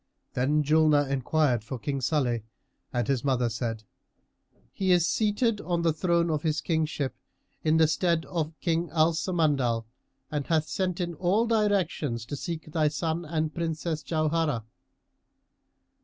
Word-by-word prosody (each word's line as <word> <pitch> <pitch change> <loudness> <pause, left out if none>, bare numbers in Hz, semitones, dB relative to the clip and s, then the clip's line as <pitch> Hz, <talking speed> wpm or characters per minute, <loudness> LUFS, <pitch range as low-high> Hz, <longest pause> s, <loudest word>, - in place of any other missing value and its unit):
Then 145 +4 +2
Julnar 150 -1 +4
enquired 135 -2 +1
for 125 +3 -5
King 135 +3 -3
Salih, 125 -4 +1 0.5
and 120 -2 -1
his 135 -4 0
mother 125 -4 +1
said, 115 -1 -3 0.9
"He 190 -1 +1
is 175 -2 +5
seated 215 +2 +1
on 170 +1 -1
the 165 -2 +3
throne 170 0 +1
of 155 -2 0
his 155 -1 0
kingship, 155 -4 -1 0.5
in 155 +1 +3
the 160 -1 +5
stead 160 +2 +1
of 160 -2 -3
King 165 0 0
Al 160 0 +4
Samandal, 145 -10 +1 0.5
and 145 -2 -2
hath 160 -2 +1
sent 180 +4 -1
in 175 -1 -2
all 185 +7 +2
directions 195 - 0
to 145 - -5
seek 165 +3 -5
thy 155 -2 +2
son 160 +2 -2
and 155 -1 -1
Princess 160 -1 -2
Jauharah." 155 -4 0
155 Hz, 145 wpm, -27 LUFS, 140-170 Hz, 0.9 s, is